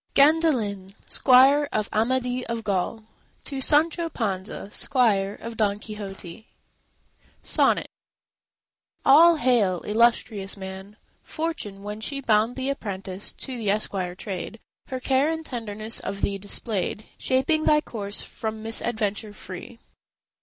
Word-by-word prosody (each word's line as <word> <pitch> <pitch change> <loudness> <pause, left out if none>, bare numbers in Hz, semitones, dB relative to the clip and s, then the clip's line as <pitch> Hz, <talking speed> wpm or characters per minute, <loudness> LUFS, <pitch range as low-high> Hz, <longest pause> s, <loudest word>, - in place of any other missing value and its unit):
GANDALIN, 255 - +3
SQUIRE 275 +3 +5
OF 215 0 -1
AMADIS 250 +3 0
OF 230 -1 -3
GAUL, 205 +2 -1 0.4
To 275 -2 -4
Sancho 325 +4 +3
Panza, 200 -5 -4
squire 210 -8 +1
of 230 -1 -7
Don 205 -2 +1
Quixote 205 -1 -8 1.0
SONNET - - +2 1.2
All 330 +4 +8
hail, 235 - +2
illustrious 215 -2 +1
man! 190 +2 -8 0.2
Fortune, 310 -12 -4
when 210 +1 -6
she 275 +4 -2
Bound 225 -1 +2
thee 265 +1 -1
apprentice 195 -6 -4
to 260 - -7
the 225 -4 -2
esquire 195 -3 -1
trade, 195 +3 -6 0.3
Her 260 - -4
care 265 +3 +2
and 320 0 -4
tenderness 225 -3 -2
of 200 - -5
thee 200 0 -1
displayed, 205 +1 -2
Shaping 275 +5 +1
thy 300 - +5
course 205 -8 -2
from 220 -1 -5
misadventure 220 -2 -1
free. 185 +5 -9
220 Hz, 120 wpm, -25 LUFS, 200-260 Hz, 1.2 s, All